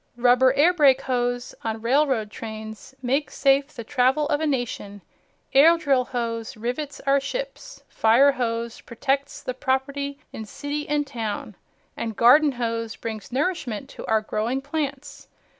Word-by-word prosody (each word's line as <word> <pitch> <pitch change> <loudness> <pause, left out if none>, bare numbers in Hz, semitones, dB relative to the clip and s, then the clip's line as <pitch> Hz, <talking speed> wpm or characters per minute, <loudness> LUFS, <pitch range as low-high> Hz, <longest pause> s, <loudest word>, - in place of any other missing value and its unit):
Rubber 250 +1 +5
air 315 +6 +4
brake 275 -5 +5
hose 245 -1 -2
on 220 0 -3
railroad 255 -4 +2
trains 220 +3 -8
makes 270 +4 -1
safe 275 0 +3
the 250 -6 -9
travel 260 +6 +2
of 290 0 +1
a 315 - +1
nation, 230 -7 -3 0.5
air 320 +5 +7
drill 275 -6 +2
hose 230 -2 -4
rivets 250 +6 -4
our 275 0 +3
ships, - - -6
fire 240 +6 +4
hose 235 -3 -3
protects 270 +4 -2
the 255 - -3
properly 280 +2 -2 0.2
in 220 - -6
city 290 +6 -5
and 295 0 +1
town 220 -5 -5 0.4
and 225 -2 -4
garden 280 +6 +6
hose 230 -2 -3
brings 220 -1 -7
nourishment 270 - -2
to - - -9
our 220 -1 +2
growing 220 +4 -2
plants. 285 -1 -5
260 Hz, 145 wpm, -24 LUFS, 230-285 Hz, 0.5 s, air